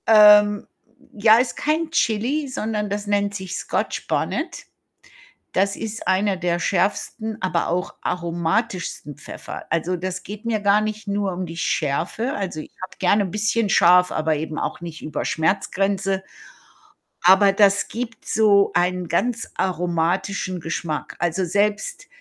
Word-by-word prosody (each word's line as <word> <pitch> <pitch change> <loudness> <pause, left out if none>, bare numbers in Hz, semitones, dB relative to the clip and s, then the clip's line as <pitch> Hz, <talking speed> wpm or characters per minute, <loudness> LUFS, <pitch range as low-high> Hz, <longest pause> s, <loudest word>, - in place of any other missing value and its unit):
Ähm, 210 -1 +7 0.5
j 205 - -12
ja, 220 0 +8
ist 250 +1 0
kein 315 +2 0
Chili, 265 +2 0
sondern 215 -5 -3
das 205 +1 -3
nennt 205 0 0
sich 190 -2 -5
Scotch - - -3
Bonnet. - - -2 0.9
Das 195 +1 +1
ist 225 +1 -6
einer 190 +1 +2
der 175 -1 -1
schärfsten, 205 +5 -1
aber 180 -3 0
auch 180 +3 -2
aromatischsten 170 - -2
Pfeffer. - - -8
Also, 165 +2 0
das 180 +1 -4
geht 210 +3 -9
mir 225 -2 0
gar 200 +1 +4
nicht 215 0 -4
nur 200 -1 -1
um 180 +1 -4
die 165 0 -8
Schärfe. 170 - -1
Also, 185 -6 -4
ich - - -11
habe 185 - -7
gerne 200 +2 +3
bisschen 210 +3 0
scharf, 180 0 +5
aber 155 0 0
eben 155 +1 -4
auch - - -3
nicht 165 -2 -7
über 155 - -4
Schmerzgrenze. 195 +3 0 1.0
Aber 195 +2 +6
das 200 0 +4
gibt 230 0 -6
so 205 -2 +4
einen 180 0 +1
ganz 235 +7 -1
aromatischen 180 +1 -1
Geschmack. 160 -1 -4
Also, 175 +2 0
selbst 205 - -1
195 Hz, 145 wpm, -22 LUFS, 175-210 Hz, 1.0 s, ja